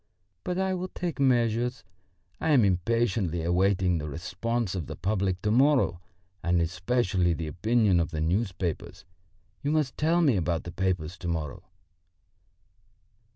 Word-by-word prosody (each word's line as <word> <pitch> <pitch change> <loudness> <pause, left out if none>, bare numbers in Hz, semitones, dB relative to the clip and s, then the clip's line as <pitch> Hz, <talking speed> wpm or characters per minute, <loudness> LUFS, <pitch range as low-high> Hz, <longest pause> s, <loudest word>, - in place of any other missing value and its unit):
But 180 - -2
I 190 0 0
will 185 0 -3
take 175 -4 -5
measures. 125 0 +1 0.6
I 160 - -1
am 125 -7 +5
impatiently 95 -2 0
awaiting 90 0 +2
the 75 0 -5
response 95 - -2
of 90 -6 -4
the - - -6
public 95 0 -1
to 105 - +1
morrow, 130 - +3 0.4
and 85 +1 +2
especially 90 +1 +1
the 80 0 -4
opinion 100 +4 +2
of 85 +1 0
the 80 -2 -4
newspapers. 90 +1 -2 0.6
You 145 - -1
must 150 -3 0
tell 165 +3 +2
me 135 -9 +3
about 85 -2 -1
the 85 - -7
papers 90 -2 -2
to 90 - -5
morrow." 80 -4 -3
95 Hz, 145 wpm, -27 LUFS, 85-120 Hz, 0.6 s, am